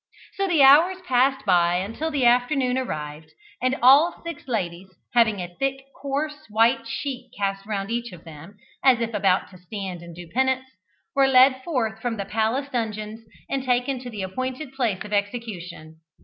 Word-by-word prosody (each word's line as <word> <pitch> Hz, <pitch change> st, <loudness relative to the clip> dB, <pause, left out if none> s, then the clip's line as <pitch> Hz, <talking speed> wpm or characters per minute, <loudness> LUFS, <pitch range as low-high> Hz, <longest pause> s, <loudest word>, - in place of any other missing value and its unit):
So 390 Hz, 0 st, -1 dB
the 330 Hz, -6 st, +4 dB
hours 320 Hz, +8 st, +7 dB
passed 265 Hz, -1 st, +2 dB
by 175 Hz, -2 st, +3 dB
until 220 Hz, -, -2 dB
the 280 Hz, -5 st, 0 dB
afternoon 250 Hz, +1 st, +3 dB
arrived, 155 Hz, -11 st, -5 dB, 0.3 s
and 255 Hz, +1 st, +1 dB
all 285 Hz, +7 st, +6 dB
six 335 Hz, -5 st, -8 dB
ladies, 190 Hz, -6 st, -3 dB, 0.2 s
having 225 Hz, -4 st, +3 dB
a 175 Hz, -1 st, -6 dB
thick 270 Hz, 0 st, -1 dB, 0.2 s
coarse 295 Hz, +2 st, -3 dB
white 230 Hz, +2 st, +2 dB
sheet 255 Hz, +1 st, -5 dB
cast 195 Hz, 0 st, -2 dB
round 200 Hz, -1 st, -3 dB
each 240 Hz, -1 st, -3 dB
of 175 Hz, -2 st, -12 dB
them, 165 Hz, +5 st, -12 dB, 0.3 s
as 260 Hz, -3 st, +5 dB
if 230 Hz, -1 st, -2 dB
about 195 Hz, -2 st, +1 dB
to 185 Hz, -, -14 dB
stand 185 Hz, -1 st, -6 dB
and 170 Hz, -1 st, -11 dB
do 175 Hz, 0 st, -10 dB
penance, 260 Hz, +6 st, 0 dB, 0.5 s
were 275 Hz, -3 st, +4 dB
led 260 Hz, 0 st, +5 dB
forth 225 Hz, -9 st, -2 dB
from 235 Hz, -2 st, -2 dB
the 200 Hz, -, -3 dB
palace 225 Hz, +7 st, -1 dB
dungeons 220 Hz, -2 st, -4 dB, 0.2 s
and 275 Hz, -1 st, -2 dB
taken 255 Hz, +1 st, 0 dB
to 250 Hz, 0 st, -8 dB
the 210 Hz, -4 st, -5 dB
appointed 255 Hz, +8 st, -5 dB
place 230 Hz, -8 st, -1 dB
of 210 Hz, -, -7 dB
execution. 200 Hz, -7 st, -4 dB
235 Hz, 175 wpm, -24 LUFS, 195-265 Hz, 0.5 s, hours